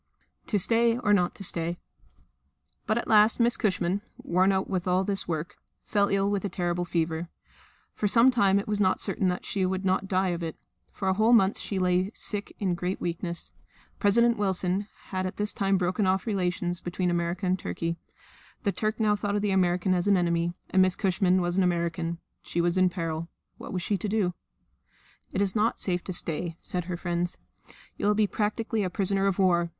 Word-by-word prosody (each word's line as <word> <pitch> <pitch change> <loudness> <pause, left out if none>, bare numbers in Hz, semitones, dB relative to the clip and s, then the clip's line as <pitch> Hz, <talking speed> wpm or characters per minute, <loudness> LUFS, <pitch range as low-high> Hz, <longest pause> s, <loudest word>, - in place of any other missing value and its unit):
To 210 - +1
Stay 230 +4 +3
or 210 -4 +2
not 180 -3 +2
to 195 - -9
Stay? 170 -1 +1 1.1
But 215 - +1
at 235 - -2
last 215 +2 +5
Miss 235 0 +3
Cushman 190 -3 0 0.2
worn 185 +3 +2
out 190 0 0
with 185 -2 -2
all 180 +1 +2
this 195 0 +1
work 165 +2 -4 0.3
fell 205 -2 +2
ill 195 0 +1
with 200 -2 -1
a 200 - -2
terrible 175 -1 -2
fever. 165 0 -2 0.6
For 210 - -1
some 230 +5 +5
time 200 -5 +3
it 200 - -2
was 210 -1 0
not 185 -1 +2
certain 190 - +1
that 180 0 -2
she 195 - -1
would 190 +1 -1
not 190 +1 +1
die 190 0 +1
of 175 -1 -2
it; 165 -2 -4 0.4
for 190 - -4
a 190 - +3
whole 220 +4 +3
month 200 -3 +4
she 200 - -4
lay 185 +1 +2
sick 205 -1 -4
in 190 -3 0
great 180 +2 -3
weakness. 170 0 -4 0.5
President 235 +3 +4
Wilson 190 0 0 0.2
had 185 -1 -2
at 185 - -7
this 210 0 0
time 195 -1 +1
broken 185 +2 0
off 190 0 +1
relations 180 -4 -1
between 175 0 -1
America 175 +2 -1
and 185 +1 +1
Turkey. 170 0 -3 0.7
The 200 - +1
Turk 215 +2 -2
now 210 -1 +3
thought 205 0 -2
of 205 - 0
the 205 - +1
American 185 0 +2
as 180 +1 0
an 200 -1 +5
enemy; 170 0 0 0.2
and 190 - +4
Miss 185 -1 +3
Cushman 185 -1 +2
was 175 +1 -1
an 190 - +4
American. 170 -1 -1 0.2
She 175 - -4
was 170 +1 +1
in 185 -1 +4
peril. 165 -2 -4 0.3
What - - -8
was 180 -2 -3
she 200 -1 -1
to 210 - -3
do? 195 -4 +1 1.0
"It 200 - +1
is 195 0 -1
not 220 +2 +1
safe 180 -2 -1
to - - -4
stay," 165 0 -1
said 180 -2 -4
her 180 -1 -4
friends. 175 0 -2 0.6
"You - - -1
will 210 - +3
be 215 0 +3
practically 215 +2 -1
a 185 - -1
prisoner 195 +1 +1
of 195 - 0
war. 175 -3 +3
185 Hz, 205 wpm, -27 LUFS, 175-205 Hz, 1.1 s, last